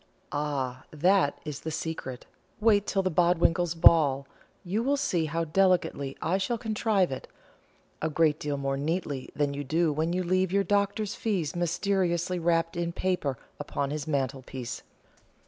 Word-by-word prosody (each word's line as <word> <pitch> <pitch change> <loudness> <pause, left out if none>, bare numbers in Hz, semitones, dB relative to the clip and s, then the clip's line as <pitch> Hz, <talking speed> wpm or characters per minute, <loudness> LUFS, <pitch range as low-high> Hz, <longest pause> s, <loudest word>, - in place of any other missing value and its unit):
"Ah, 135 -4 -2
that 175 0 +2
is 150 -2 -5
the 160 - -5
secret. 155 -5 -5 0.3
Wait 210 -2 +3
till 195 -1 +1
the 185 - 0
Bodwinkles' 170 0 +2
ball. 140 -5 +5 0.4
You 200 +4 -1
will 280 +4 +1
see 180 - 0
how 165 +2 -1
delicately 165 -5 +1
I 185 +3 +1
shall 235 +5 -1
contrive 215 - +1
it; 130 - -5 0.7
a 160 - 0
great 155 -1 +2
deal 145 -1 -2
more 135 0 -1
neatly 145 -3 -2
than 145 -1 0
you 145 +1 -4
do 160 +3 +1
when 160 +3 0
you 185 +1 0
leave 185 +1 +1
your 200 +1 +3
doctor's 200 +2 0
fee 200 -7 -1
mysteriously 175 0 0
wrapped 165 0 +1
in 170 0 -1
paper 170 -8 -1 0.2
upon 140 -1 -3
his 150 0 -4
mantelpiece. 130 -3 -3
165 Hz, 155 wpm, -28 LUFS, 145-185 Hz, 0.7 s, ball